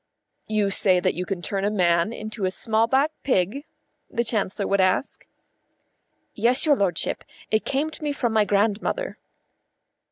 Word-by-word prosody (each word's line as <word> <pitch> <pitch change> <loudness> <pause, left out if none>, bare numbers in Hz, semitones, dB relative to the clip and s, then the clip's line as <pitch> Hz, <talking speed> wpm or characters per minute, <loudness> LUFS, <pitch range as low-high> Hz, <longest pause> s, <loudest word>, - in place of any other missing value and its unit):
"You 210 -2 +1
say 185 -2 +3
that - - +1
you 180 0 -4
can 185 -3 -4
turn 195 +2 -2
a 205 - +2
man 175 -1 +2
into 215 -2 -5
a - - +2
small 220 +4 +1
black 270 +5 +2
pig?" 250 - 0 0.4
the 235 - -1
Chancellor 205 -3 -1
would 200 0 +2
ask. 185 +8 0 1.1
"Yes, 240 +7 +2
your 295 -2 +5
lordship. 190 -8 0 0.3
It 215 0 +1
came 290 +3 -1
to 310 - -8
me 295 - 0
from 245 -5 -1
my 215 -1 +4
grandmother." 210 - 0
215 Hz, 160 wpm, -24 LUFS, 190-245 Hz, 1.1 s, your